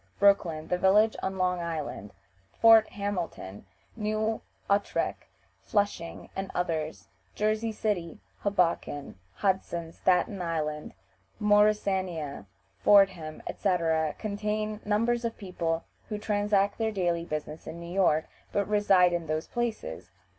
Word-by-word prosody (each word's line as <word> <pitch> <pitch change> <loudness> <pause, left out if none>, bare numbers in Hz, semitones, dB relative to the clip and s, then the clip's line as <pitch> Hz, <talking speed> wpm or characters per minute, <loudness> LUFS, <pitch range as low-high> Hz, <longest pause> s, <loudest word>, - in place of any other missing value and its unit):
Brooklyn, 175 -6 +3
the 180 - +1
villages 210 +4 +4
on 190 0 -2
Long 180 -1 +1
Island, 155 - -4 0.5
Fort 225 -1 +7
Hamilton, 175 - -5 0.3
New 215 0 -1 0.3
Utrecht, 200 +1 0 0.4
Flushing, 200 -5 -1
and 195 0 -3
others; 155 - -2 0.3
Jersey 215 +2 0
City, 205 -5 -2 0.2
Hoboken, 170 - -1 0.2
Hudson, 175 -4 -1
Staten 185 +2 +1
Island, 155 -3 -3 0.4
Morrisania, 195 - +1 0.3
Fordham, 185 -6 +4
etc., 165 -5 0
contain 215 0 -2
numbers 230 +3 +1
of 230 -1 -3
people 170 -4 -2 0.3
who 210 - -2
transact 205 -1 +1
their 220 -1 +1
daily 175 -4 0
business 155 -1 -5
in 170 - -6
New 170 +1 -7
York, 170 -5 +3 0.3
but 200 -1 0
reside 195 -4 +4
in 170 -2 -2
those 155 +1 -1
places. 240 - -4
190 Hz, 115 wpm, -28 LUFS, 165-210 Hz, 0.5 s, Fort